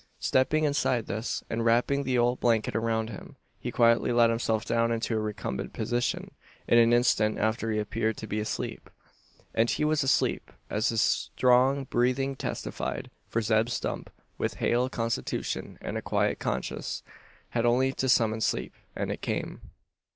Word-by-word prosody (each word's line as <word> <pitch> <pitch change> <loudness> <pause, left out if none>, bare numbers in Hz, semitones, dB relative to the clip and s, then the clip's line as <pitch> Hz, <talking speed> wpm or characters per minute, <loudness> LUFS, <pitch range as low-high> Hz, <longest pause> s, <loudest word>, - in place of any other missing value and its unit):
Stepping 150 +4 +2
inside 130 -5 +1
this, 110 +4 -3
and 115 0 -2
wrapping 120 +5 +3
the 130 -2 0
old 120 +1 +2
blanket 115 -2 +1
around 110 0 0
him, 100 - -10 0.2
he - - -4
quietly 115 0 +3
let 120 -1 +5
himself 115 -1 0
down 115 0 +1
into 115 0 -1
a - - +1
recumbent 105 -11 -4
position. 120 +2 -1 0.4
In 120 - +6
an 115 0 +5
instant 120 -3 +3
after 110 +1 0
he 110 - 0
appeared 110 +1 -1
to - - -6
be 105 0 -2
asleep. 105 - -4 0.6
And 115 +1 +2
he 150 - +1
was 155 0 +2
asleep, 135 0 +1 0.2
as 110 +3 +1
his 115 -2 +1
strong 130 +4 +3
breathing 130 +2 0
testified: - - -4 0.2
for 115 - 0
Zeb 110 +1 +2
Stump, 120 - -3 0.3
with - - -1
a - - -15
hale 125 +2 +1
constitution 115 -2 -3
and - - -3
a - - -8
quiet - - 0
conscience, - - -3 0.5
had 120 0 +1
only 130 +3 +3
to 130 0 -1
summon 110 -3 +3
sleep, - - -1 0.2
and - - -2
it - - -5
came. - - -3
115 Hz, 165 wpm, -28 LUFS, 110-125 Hz, 0.6 s, In